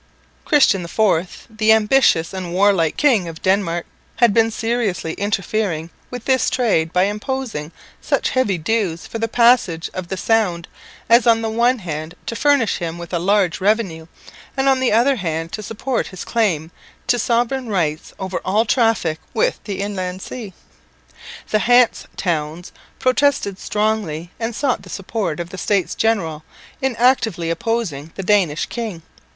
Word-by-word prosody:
Christian 270 - +4
IV, 180 -1 0
the 220 -1 +2
ambitious 220 -6 +3
and 185 -2 -5
warlike 190 -4 +3
King 235 -12 +3
of 160 -1 -9
Denmark, 185 -3 +1 0.3
had 235 -4 +4
been 225 0 +4
seriously 225 -7 -2
interfering 195 -4 -2 0.2
with 245 -2 -7
this 260 -1 +2
trade 205 -11 +1
by 180 +1 +3
imposing 210 - -3 0.3
such - - 0
heavy 235 -8 +1
dues 175 -1 -1
for 230 - -6
the 225 - 0
passage 230 -9 +3
of 185 -2 -5
the 190 - -4
Sound 185 -6 +1 0.4
as 235 +1 +5
on 225 -1 +4
the 220 - -1
one 240 +3 +2
hand 160 -4 -6
to 230 - -4
furnish 285 -4 +2
him 170 -1 -4
with 170 +1 -9
a 175 - +1
large 190 -1 +1
revenue, 190 -6 0 0.5
and 270 0 +1
on 265 -1 +4
the 260 - +1
other 250 +5 +3
hand 165 -3 -3
to 215 - -5
support 230 +5 -2
his 185 - -8
claim 175 -9 0 0.3
to 245 - +2
sovereign 240 +2 0
rights 160 -6 -1
over 190 -1 -3
all 210 +4 +2
traffic 220 -10 +1 0.2
with 220 - +1
the 200 -2 -4
inland 185 -2 -4
sea. 215 -7 -8 1.0
The 215 - +3
Hanse 245 +1 +3
towns 165 -1 -2 0.3
protested 255 -7 +1
strongly 210 -6 -2
and 225 0 -3
sought 270 -2 0
the - - -14
support 195 -4 -3
of 175 +1 -5
the 190 - -7
States 200 -4 0
General 170 -9 0 0.4
in 265 -2 0
actively 225 -9 +2
opposing 170 -7 -2
the 195 - -5
Danish 180 -6 +2
king. 215 -9 -5
205 Hz, 155 wpm, -20 LUFS, 170-230 Hz, 1.0 s, as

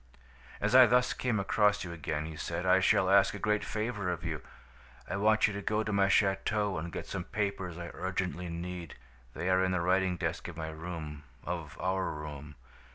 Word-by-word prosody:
"'As 105 +3 0
I 130 -1 +9
thus 125 +1 +3
came 120 -4 0
across 105 +1 +2
you 90 - -6
again,' 80 -2 -3
he 80 0 -7
said, 85 +2 -3
'I 95 +1 +5
shall 95 0 +3
ask 100 +1 +5
a - - -4
great 105 +1 0
favor 110 -3 -2
of 85 -2 -4
you. 80 -3 -3 0.7
I - - -3
want 110 +2 +4
you 105 - 0
to 100 - -4
go 105 +2 0
to 105 -1 -3
my 100 -1 +4
château 100 -1 +2
and 85 +2 -5
get - - -5
some 95 -3 -4
papers 95 -4 -3
I 85 -1 -6
urgently 90 -1 -3
need. 85 0 -6 0.4
They 90 - -3
are 95 0 +4
in 95 - +1
the 90 - +1
writing 90 0 +2
desk - - -3
of - - -8
my 80 -1 -4
room, 80 -2 -6 0.2
of 85 -4 -5
our 95 +1 0
room. 75 -1 -7
95 Hz, 205 wpm, -31 LUFS, 85-100 Hz, 0.7 s, I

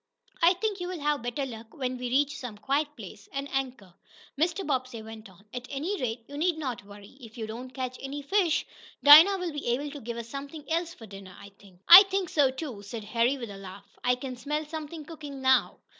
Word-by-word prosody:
"I 340 +2 +6
think 410 +1 -2
you'll 355 -1 -4
have 295 -1 0
better 245 +4 -3
luck 225 -3 -10
when 255 -2 -3
we 250 -1 -3
reach 285 +3 +1
some 245 -7 -7
quiet 275 +8 0
place, 205 -1 -11
and 275 0 -4
anchor," 255 -9 -3 0.4
Mr. 340 +6 0
Bobbsey 255 -5 -2
went 220 -1 -10
on. 190 +2 -20
"At 250 0 -6
any 320 +9 -3
rate, 230 -1 -3
you 285 - -8
need 340 0 +1
not 255 -9 -4
worry, 205 +5 -14
if 230 0 -12
you 225 - -4
don't 235 +4 -7
catch 255 -1 -5
any 280 +1 -6
fish. 355 +1 +1 0.4
Dinah 320 +7 +10
will 360 -2 -3
be 295 - -5
able 275 +5 -1
to 290 -1 -9
give 235 +1 -6
us 235 -1 -6
something 280 +4 -8
else 335 +1 -1
for 225 - -12
dinner, 195 -3 -12
I 200 - -11
think." 195 -2 -21
"I 350 +3 +13
think 385 -3 -1
so, 285 -4 +3
too," 260 -5 -6
said 210 +2 -7
Harry 235 +5 +1
with 235 -5 -7
a 200 - -9
laugh. 195 0 -10 0.2
"I 250 0 +3
can 255 0 -6
smell 300 +5 -3
something 310 0 -7
cooking 295 -4 -9
now." 260 0 +3
265 Hz, 220 wpm, -28 LUFS, 230-300 Hz, 0.4 s, I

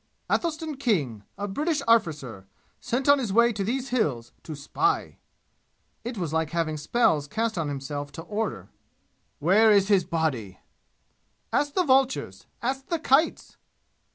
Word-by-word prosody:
"Athelstan 315 -3 -1
King 145 - -1
a 205 +1 -3
British 295 - -1
arrficer 150 - +1 0.3
sent 250 +3 -2
on 285 0 +6
his 235 -7 -2
way 235 +3 +4
to 200 -1 -2
these 250 +5 -2
'Hills' 145 - -1
to 155 - -7
spy!" 375 - -1 0.8
It 240 0 -5
was 170 -5 -3
like 160 -1 0
having 165 -2 -1
spells 150 -3 +1
cast 225 +5 -1
on 165 -4 -1
himself 145 +1 -5
to 165 - -7
order! 205 - -4 0.7
"Where 200 +8 +4
is 200 -1 +4
his 195 -3 +4
body?" 135 - -2 1.0
"Ask 290 0 +1
the 370 - +3
vultures! 265 -3 +1 0.2
Ask 265 +2 -2
the 335 - 0
kites!" 310 +1 +1
205 Hz, 145 wpm, -26 LUFS, -, 1.0 s, on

